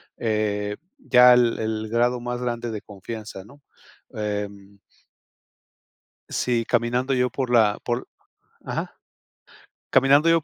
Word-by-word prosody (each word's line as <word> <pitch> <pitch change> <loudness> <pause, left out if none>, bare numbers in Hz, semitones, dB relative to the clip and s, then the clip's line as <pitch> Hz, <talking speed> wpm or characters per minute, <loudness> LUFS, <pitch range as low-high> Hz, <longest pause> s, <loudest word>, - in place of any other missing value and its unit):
eh, 105 -2 -1 0.2
ya 125 - +6
el 120 -1 +3
el 110 0 -3
grado 120 +1 +1
más 120 0 -4
grande 120 -1 -3
de 105 - -5
confianza, 105 0 -8
¿no?, 140 +7 -18 0.5
em 100 -2 -5 1.5
Sí, 120 -2 0
caminando 125 +3 0
yo 125 0 +2
por 130 -2 -3
la 110 -4 +3
por 120 +1 -2 0.6
ajá, - - -4 0.9
caminando 140 +4 +5
yo 165 -2 +3
120 Hz, 115 wpm, -24 LUFS, 105-125 Hz, 1.5 s, ya